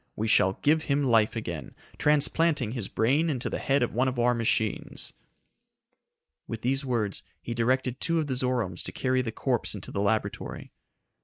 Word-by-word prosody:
We 110 Hz, -, -2 dB
shall 95 Hz, -3 st, +4 dB
give 155 Hz, +2 st, +3 dB
him 145 Hz, 0 st, +1 dB
life 115 Hz, -4 st, +3 dB
again, 85 Hz, -10 st, -5 dB, 0.2 s
transplanting 150 Hz, -3 st, +3 dB
his 115 Hz, -6 st, -4 dB
brain 140 Hz, +9 st, +2 dB
into 135 Hz, -3 st, -2 dB
the -, -, -2 dB
head 140 Hz, -2 st, +2 dB
of 120 Hz, -, -2 dB
one 125 Hz, +4 st, +2 dB
of 130 Hz, -1 st, -2 dB
our 120 Hz, +1 st, +3 dB
machines." 110 Hz, -2 st, -1 dB, 1.3 s
With 115 Hz, 0 st, -6 dB
these 135 Hz, +3 st, +1 dB
words 115 Hz, -7 st, -1 dB, 0.2 s
he 120 Hz, -, -5 dB
directed 125 Hz, +2 st, 0 dB
two 165 Hz, -1 st, +1 dB
of 160 Hz, -, +1 dB
the 140 Hz, -, -2 dB
Zoromes 125 Hz, -8 st, -1 dB
to -, -, -4 dB
carry 130 Hz, 0 st, 0 dB
the 115 Hz, -3 st, -3 dB
corpse 120 Hz, -1 st, 0 dB
into 100 Hz, -, -7 dB
the 100 Hz, -, -2 dB
laboratory. 105 Hz, +2 st, -2 dB
125 Hz, 175 wpm, -27 LUFS, 110-135 Hz, 1.3 s, shall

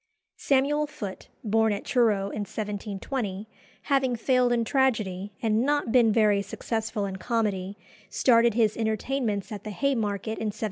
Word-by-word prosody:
Samuel 290 Hz, +2 st, +1 dB
Foote, 205 Hz, -10 st, -7 dB, 0.2 s
born 220 Hz, 0 st, +2 dB
at 200 Hz, -, -3 dB
Truro 215 Hz, -6 st, +2 dB
in -, -, -5 dB
1720, 205 Hz, +1 st, -4 dB, 0.4 s
having 270 Hz, -3 st, +1 dB
failed 250 Hz, +1 st, +2 dB
in 235 Hz, -1 st, +1 dB
tragedy, 215 Hz, -8 st, 0 dB
and 220 Hz, +1 st, +2 dB
not 290 Hz, -3 st, 0 dB
been 235 Hz, -3 st, +5 dB
very 210 Hz, -2 st, +3 dB
successful 215 Hz, +1 st, -3 dB
in 190 Hz, -1 st, -5 dB
comedy, 205 Hz, -3 st, -2 dB, 0.3 s
started 235 Hz, -3 st, +3 dB
his 220 Hz, -3 st, +2 dB
entertainments 220 Hz, -1 st, -2 dB
at 210 Hz, -, -6 dB
the 215 Hz, -, -6 dB
Haymarket 220 Hz, -3 st, -1 dB
in 220 Hz, -, -2 dB
1747. 210 Hz, -, -5 dB
220 Hz, 145 wpm, -26 LUFS, 205-245 Hz, 0.4 s, been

